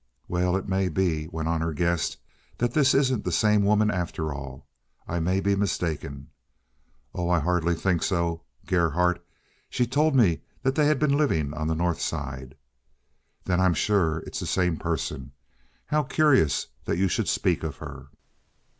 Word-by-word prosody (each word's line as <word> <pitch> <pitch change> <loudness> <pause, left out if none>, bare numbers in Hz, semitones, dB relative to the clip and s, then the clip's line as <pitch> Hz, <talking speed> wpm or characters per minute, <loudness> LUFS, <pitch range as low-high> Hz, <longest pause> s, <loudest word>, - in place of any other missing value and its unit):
"Well, 90 +1 +1
it 95 - -5
may 95 -1 +1
be," 80 -3 0
went 80 -1 -4
on 80 -1 0
her 80 0 -1
guest, 85 +2 0 0.4
"that 120 0 0
this 145 -3 +4
isn't 130 -5 +2
the 90 - -2
same 105 +4 +3
woman 105 +1 +3
after 85 -4 -3
all. 70 -1 -8 0.4
I 85 - -2
may 90 +4 +1
be 100 0 +1
mistaken." 80 -8 -3 0.8
"Oh, 85 -1 -2
I 90 - +4
hardly 85 +1 +1
think 85 0 0
so. 85 -2 0 0.2
Gerhardt! 90 0 +1 0.5
She 125 - +1
told 145 +4 +2
me 100 -11 +4 0.2
they 135 +3 +2
had 150 -1 +3
been 140 0 +2
living 80 - +1
on 80 0 -3
the 80 - 0
North 85 0 -1
Side." 65 -4 -4 0.9
"Then 90 -1 0
I'm 95 -2 +3
sure 80 -2 +1
it's - - -5
the - - -4
same 90 -3 +1
person. 70 -5 -3 0.5
How 150 0 +1
curious 135 - +3 0.2
that - - -1
you 95 +1 +2
should 85 - -1
speak - - +1
of - - -5
her!" 70 -3 -9
90 Hz, 165 wpm, -26 LUFS, 80-105 Hz, 0.9 s, this